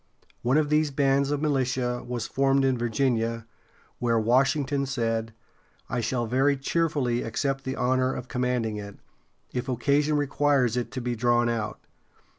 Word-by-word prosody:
One 125 +4 +2
of 155 -1 +2
these 150 0 +3
bands 140 0 +2
of 145 +1 -1
militia 125 -4 0
was 120 -2 -4
formed 135 +2 +2
in 130 -1 +2
Virginia, 115 -1 0 0.5
where 120 -1 +1
Washington 135 +4 +2
said: 115 -4 -1 0.6
"I 125 - 0
shall 120 +1 -1
very 135 +4 +2
cheerfully 140 -4 0
accept 135 +4 -2
the 130 0 -2
honor 130 +1 +1
of 125 - -6
commanding 125 -4 -1
it, 100 -1 -8 0.6
if 125 +1 -3
occasion 145 +4 +2
requires 140 -4 +2
it 125 -1 -2
to 130 - -3
be 120 0 -2
drawn 120 0 +2
out." 110 -3 -3
130 Hz, 150 wpm, -26 LUFS, 120-140 Hz, 0.6 s, these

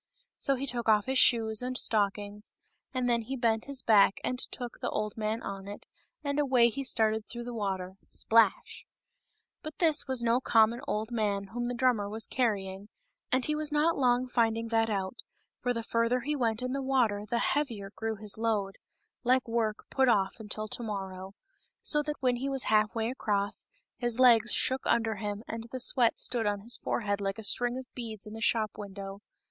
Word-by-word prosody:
So 275 - 0
he 265 +2 -4
took 240 -3 -1
off 210 -1 +4
his 265 0 +1
shoes 220 -2 +4
and 255 0 -2
stockings, 205 -1 0 0.4
and 255 -2 -1
then 235 -1 +2
he 255 +4 -5
bent 230 -3 0
his 280 -2 0
back 205 -3 +5
and 250 - -2
took 245 -2 -3
the - - -2
old 210 0 -3
man 220 +1 -2
on 195 0 -6
it, 205 - -8 0.4
and 285 0 -1
away 255 -5 +4
he 275 +4 -4
started 220 -4 +1
through 240 -1 -3
the 240 0 -6
water 190 -4 -3
— - - -38
splash! 225 -3 +1 0.7
But 310 0 -8
this 315 -4 +2
was 260 -2 0
no 235 +1 +3
common 230 0 +3
old 215 +2 -2
man 200 -4 -1
whom 240 +3 -3
the 245 0 -2
drummer 240 -5 +1
was 220 +2 -3
carrying, 200 -5 -2 0.4
and 255 0 +2
he 305 - 0
was 300 0 -1
not 305 +3 +2
long 250 -1 +2
finding 230 -2 0
that 225 0 +2
out, 195 +1 -2 0.4
for 245 - -1
the 230 -1 -2
farther 230 +2 +1
he 295 +3 -2
went 230 -3 -1
in 255 - -2
the 275 +1 -2
water 235 -6 +1
the 235 - 0
heavier 230 -8 -1
grew 225 0 -3
his 210 0 -4
load 210 -4 -1 0.3
— - - -52
like 255 0 +2
work 230 -2 -1
put 265 -2 +3
off 195 -1 +1
until 215 0 -3
to - - 0
morrow 195 -3 -6 0.2
— - - -44
so 295 - +5
that, 295 0 -5
when 250 -2 +2
he 270 +3 -3
was 270 -1 +1
half 215 0 +2
way 225 +1 -1
across, 205 -4 -1 0.3
his 240 -1 0
legs 235 -3 +6
shook 260 +1 +3
under 225 -2 +1
him 205 +1 -4
and 230 0 -6
the 260 - -4
sweat 245 -1 +4
stood 235 -3 -1
on 205 -1 -1
his 235 +4 -1
forehead 205 -2 -2
like 195 +1 -2
a 220 - -8
string 240 +4 +1
of 260 - -6
beads 225 -4 -5
in 210 - -9
the 225 - -8
shop 215 -1 +1
window. 195 -1 -7
230 Hz, 205 wpm, -29 LUFS, 210-250 Hz, 0.7 s, legs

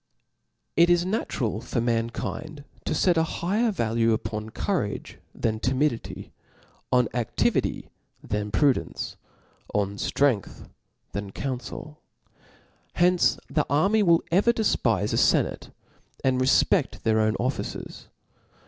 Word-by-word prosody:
It 170 +1 +5
is 175 0 +4
natural 130 - -2
for - - -2
mankind 120 +6 -2 0.2
to - - -1
fet 180 -3 +3
a 160 - +4
higher 205 +8 0
vajue 115 - +1
upon 110 0 -3
courage 120 - -3 0.2
than 110 -1 -1
timidity, 130 +1 -1 0.6
on 125 -2 +4
adivity 120 -1 -1 0.3
than 105 0 -2
pru 140 +6 +4
dence, - - -6 0.6
on 100 0 0
ftrcngth 130 -5 0 0.4
than 100 -1 -5
counfel. 135 +4 -6 0.9
Hence 180 0 +3
the 150 - 0
army 195 +10 +3
v(tll 170 -4 +4
ever 200 +7 +4
defpife 115 - +1
a - - +1
fenate, - - +2 0.5
and 130 -1 +2
refped 130 - +2
their 110 -1 +3
own 110 0 +2
of 130 +2 0
ficers. - - -7
130 Hz, 120 wpm, -26 LUFS, 110-170 Hz, 0.9 s, It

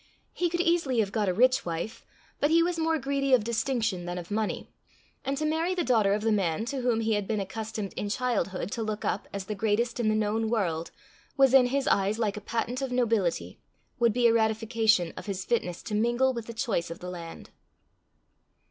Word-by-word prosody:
He 350 -1 0
could 345 +1 0
easily 335 -8 +2
have 205 -3 +1
got 210 -3 0
a - - +3
rich 255 +6 +4
wife, 170 +6 -5 0.3
but 290 - +2
he 335 +1 +5
was 345 -1 -1
more 325 0 +2
greedy 275 -1 +2
of 235 - 0
distinction 225 -5 -1
than 175 0 -3
of 175 +2 -7
money, 215 0 -2 0.6
and 275 0 -2
to 305 - -1
marry 325 +4 0
the 350 - 0
daughter 215 -7 +3
of 210 - -3
the 225 - +2
man 195 -1 0
to 270 - -2
whom 240 -2 +1
he 220 0 +1
had 205 -2 -1
been 215 -2 0
accustomed 215 +1 -4
in 205 - -3
childhood 205 -5 -1
to 230 - -3
look 215 -1 -3
up - - -1
as 200 -1 -5
the 210 - -3
greatest 220 +3 0
in 225 -2 +2
the 215 - +2
known 220 +1 0
world, 170 -8 -1 0.5
was 270 -2 +5
in 260 -2 +7
his 275 +2 -1
eyes 200 +2 +2
like 215 -3 0
a 210 - -6
patent 235 +4 -2
of 265 -2 -3
nobility, 225 -8 0 0.4
would 235 -1 +4
be 240 +2 +1
a 230 - +6
ratification 220 -4 +2
of - - -9
his 190 -1 -3
fitness 180 -7 -1
to 215 - -6
mingle 240 +5 +2
with 235 -2 -6
the 230 - -6
choice 225 -8 -1
of 165 - -6
the 180 0 -7
land. 170 -2 -9
225 Hz, 220 wpm, -28 LUFS, 205-255 Hz, 0.6 s, in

